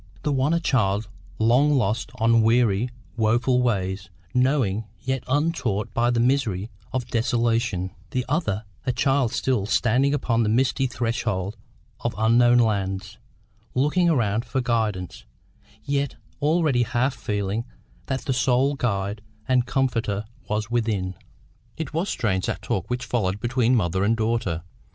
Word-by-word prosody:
The 150 - 0
one 135 +2 +2
a 170 - +2
child 105 - +1 0.3
long 125 +7 +4
lost 115 -2 0
on 115 -1 +4
weary, 115 0 +3 0.3
woeful 120 +3 +2
ways, 95 -5 -1 0.2
knowing, 125 -5 +1
yet 130 -1 -2
untaught 130 - 0
by, 120 +1 +2
the 120 -1 +1
misery 115 -5 +1 0.2
of 130 -2 -2
desolation; 115 -5 0 0.2
the 125 +4 -2
other 115 - -1 0.2
a 130 - 0
child 135 -3 +2
still 120 -7 0
standing 125 +5 +2
upon 115 -5 +1
the 110 - +1
misty 130 +3 +2
threshold 115 -5 -2 0.4
of 120 - -2
unknown 120 +2 +5
lands, 100 -3 0 0.6
looking 150 +7 +3
around 115 -7 +1
for 125 +2 -2
guidance, 110 -7 -1 0.6
yet 140 -1 -1 0.3
already 150 -4 +2
half 120 +3 +1
feeling 105 -2 -2 0.4
that 130 -1 -2
the 135 - -1
sole 130 +3 +2
guide 105 -5 -2 0.3
and 125 -1 +2
comforter 120 -6 0 0.2
was 105 +1 -2
within. 110 -6 0 0.6
It 160 -2 -5
was 170 +5 -1
strange 95 -5 0
that - - -3
talk 95 - -2
which 125 0 -2
followed 100 -5 -1
between 120 +2 +2
mother 95 -3 +1
and 110 +3 +2
daughter. 110 -7 -1
120 Hz, 140 wpm, -24 LUFS, 105-130 Hz, 0.6 s, unknown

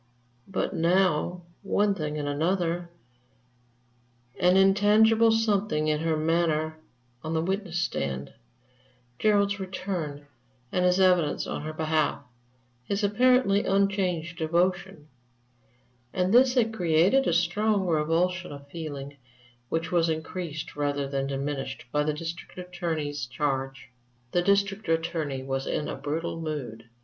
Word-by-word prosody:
But 195 - -2
now 175 0 +1 0.2
one 205 +1 +1
thing 150 -5 -4
and 145 -1 -3
another 170 +3 -1 1.5
an 180 0 +4
intangible 210 +4 +5
something 205 -8 +1
in 150 0 +1
her 160 0 0
manner 155 -1 0 0.5
on 160 +1 -3
the 160 - +1
witness 190 -1 -2
stand; 70 - -2 0.9
Gerard's 205 -1 +2
return 180 -6 -4 0.5
and 180 - +1
his 180 +1 +3
evidence 180 -5 +3
on - - -4
her 155 +1 -5
behalf; 155 -2 0 0.6
his 200 - -2
apparently 225 0 +3
unchanged 185 -4 0
devotion 175 0 0 1.1
all 185 0 +1
this 250 +2 +5
had 225 -3 +2
created 180 +8 +3
a - - +3
strong 190 +4 +1
revulsion 170 +2 0
of 140 -1 -10
feeling, 145 -3 -7 0.5
which 165 0 -2
was 170 -2 +2
increased 160 0 -4
rather 145 -1 -1
than 135 0 -2
diminished 135 -1 -4
by 150 - +1
the 150 +1 +1
District 165 +5 -7
Attorney's 160 -6 -3
charge. 135 -1 -3 0.4
The 175 - +2
District 200 0 +1
Attorney 160 -5 -1
was 135 0 -3
in 150 - -1
a - - -4
brutal 165 +2 -3
mood. 125 -8 -5
170 Hz, 125 wpm, -27 LUFS, 150-195 Hz, 1.5 s, intangible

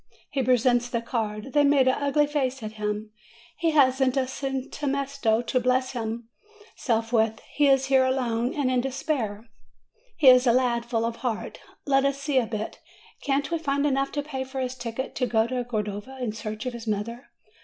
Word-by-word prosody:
He 275 - 0
presents 245 -1 +3
the 235 - -1
card; 220 0 -3
they 290 -1 +5
make 280 -2 +4
an 260 - +4
ugly 285 +2 +2
face 270 -4 -2
at 215 - -4
him: 210 0 -4 0.5
he 330 - +2
hasn't 265 -3 +3
a 265 - +2
272 270 +2 -4
MAY 275 +1 +1
centesimo 245 -4 0
to 255 - +1
bless 255 +1 +1
himself 235 - -4
with. 225 -1 +2
He 290 -1 +3
is 270 -1 +4
here 265 -1 +4
alone 250 -2 0
and 275 -3 +1
in 250 -1 +2
despair. 250 -5 -3 0.7
He 295 - +3
is 255 0 +8
a 235 - +5
lad 240 -2 +1
full 230 -1 0
of 230 0 -3
heart. 240 -4 -4 0.3
Let 270 -1 +3
us 275 0 0
see 280 -1 +1
a 235 - -1
bit. 215 -1 -5 0.4
Can't 275 +2 0
we 335 - 0
find 280 -2 0
enough 275 -1 +1
to 290 - -1
pay 270 -3 -4
for 265 0 -6
his 255 -1 -2
ticket 245 +1 -5
to 250 - +1
go 220 -2 +2
to 250 +1 -2
Cordova 215 +2 -4
in 245 -4 -2
search 215 +2 -6
of 250 - -3
his 230 -1 -8
mother? 225 +4 -3
255 Hz, 195 wpm, -26 LUFS, 230-275 Hz, 0.7 s, is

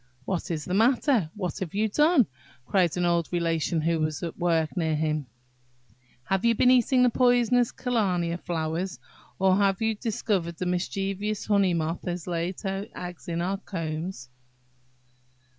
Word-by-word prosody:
"What 190 0 -2
is 155 -3 -3
the 180 - -3
matter? 230 - +3
what 190 -2 -4
have 190 -2 -5
you 215 +2 +2
done?" 295 - +4 0.4
cried 180 +1 +2
an 175 - +1
old 170 -1 +1
Relation 165 -1 0
who 165 +1 +1
was 155 0 -2
at 170 - -4
work 165 -3 0
near 160 -4 0
him; 155 -2 -1 1.0
"have 190 +7 -1
you 235 0 +4
been 250 +3 +5
eating 255 +1 +4
the 250 - +4
poisonous 245 -1 +3
kalmia 180 -8 0
flowers, 170 +2 -3 0.4
or 190 0 +3
have 195 -2 +2
you 225 0 +1
discovered 205 -6 -1
that - - -27
the 180 - -3
mischievous 195 +3 -2
honey 200 -4 +3
moth 165 +1 -2
has 175 -1 -3
laid 175 +1 -3
her 195 0 -3
eggs 180 -1 -8
in 170 0 -2
our 195 +2 -1
combs?" 165 -6 -5
180 Hz, 160 wpm, -26 LUFS, 170-210 Hz, 1.0 s, been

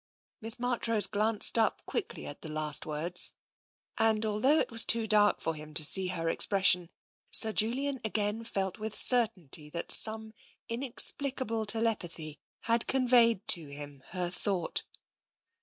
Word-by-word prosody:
Miss 225 +2 +6
Marchrose 235 -3 -1
glanced 215 +2 -1
up 220 - -2
quickly 440 - -6
at 145 - -9
the 160 - -9
last 155 -1 -2
words, 160 +4 -3 0.7
and 220 -1 +1
although 220 +8 +1
it - - -2
was 230 0 +4
too 230 -1 +3
dark 210 -1 +1
for 165 - -3
him 155 0 -12
to 155 -2 +2
see 190 +4 +3
her 170 -2 -5
ex - - +4
pression, 190 -3 +2 0.4
Sir 220 - +6
Julian 265 +5 -2
again 215 0 -3
felt 195 -2 -5
with 215 0 -6
certainty 190 - 0
that 170 +2 -3
some 220 0 +4 0.3
inexplicable 250 -1 0
telepathy 175 -9 -1 0.2
had 230 0 +2
conveyed 240 -5 +2
to 165 -4 +5
him 145 -1 -8
her 180 -1 -4
thought. 185 -1 -2
215 Hz, 145 wpm, -28 LUFS, 170-230 Hz, 0.7 s, Miss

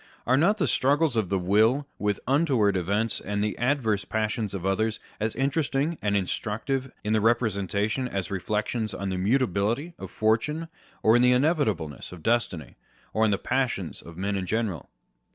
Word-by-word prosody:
Are 130 - +3
not 180 +10 +3
the 195 - +1
struggles 145 +1 +2
of 110 -5 0
the 100 - +1
will 110 +9 +3
with 105 -1 0
untoward 130 -8 +3
events 100 +5 0
and 100 +1 -2
the 105 - -1
adverse 120 -6 +1
passions 110 -1 -2
of 95 -1 -5
others 110 +3 0 0.2
as 110 +1 -1
interesting 140 +3 0
and 100 -1 +1
instructive 115 +7 -2
in 105 +1 0
the 110 - +3
representation 110 +1 +1
as 100 -3 -4
reflections 105 +3 -2
on 100 0 -3
the 95 -1 -2
mutability 115 - +1
of - - -7
fortune 150 +10 0 0.3
or 110 +1 +6
inevitableness 125 - +1
of 90 -3 -11
destiny, 105 - -1 0.4
or 110 +1 +3
on - - +3
the 100 - +2
passions 125 -10 -1
of 85 0 -12
men 100 +2 -1
in 95 -2 -3
general 110 - -2
110 Hz, 165 wpm, -26 LUFS, 100-130 Hz, 0.4 s, or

